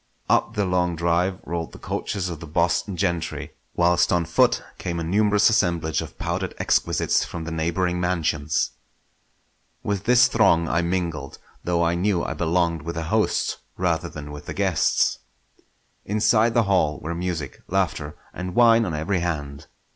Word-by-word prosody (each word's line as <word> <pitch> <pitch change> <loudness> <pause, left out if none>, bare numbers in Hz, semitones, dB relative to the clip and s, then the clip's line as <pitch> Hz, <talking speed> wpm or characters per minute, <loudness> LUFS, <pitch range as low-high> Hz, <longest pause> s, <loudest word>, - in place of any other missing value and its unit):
Up - - +2
the 105 -1 +1
long 90 -1 +1
drive 85 +3 0
rolled 85 0 -4
the - - -10
coaches 95 -3 -3
of 85 -3 -5
the 80 - -9
Boston 85 +4 0
gentry, 85 -2 -2 0.2
whilst 90 0 +3
on 85 -2 +2
foot 80 - +2 0.2
came 85 -1 -3
a - - -2
numerous 105 +4 +3
assemblage 85 -8 +1
of - - -9
powdered - - -3
exquisites - - +1
from 85 - -6
the 85 - -5
neighbouring 85 +2 -1
mansions. 80 -4 0 1.1
With 100 0 -2
this 125 +1 +6
throng 85 -7 +3
I 85 - +1
mingled, 85 -5 -3 0.3
though 85 -1 +1
I 85 0 +2
knew 90 0 +1
I - - -2
belonged 85 -1 0
with 85 +3 -5
the 85 - -3
hosts - - +1 0.2
rather 85 -2 0
than 75 -2 -8
with 75 0 -9
the - - -5
guests. 95 -7 +2 0.8
Inside 110 +2 +2
the 120 - +5
hall 95 -7 +1
were 85 +2 -4
music, 85 -6 -4
laughter, 85 -6 -1 0.2
and 90 0 -5
wine 115 -1 +6
on 85 -5 -3
every 85 +5 -1
hand. 70 -5 -4
85 Hz, 160 wpm, -24 LUFS, 80-95 Hz, 1.1 s, this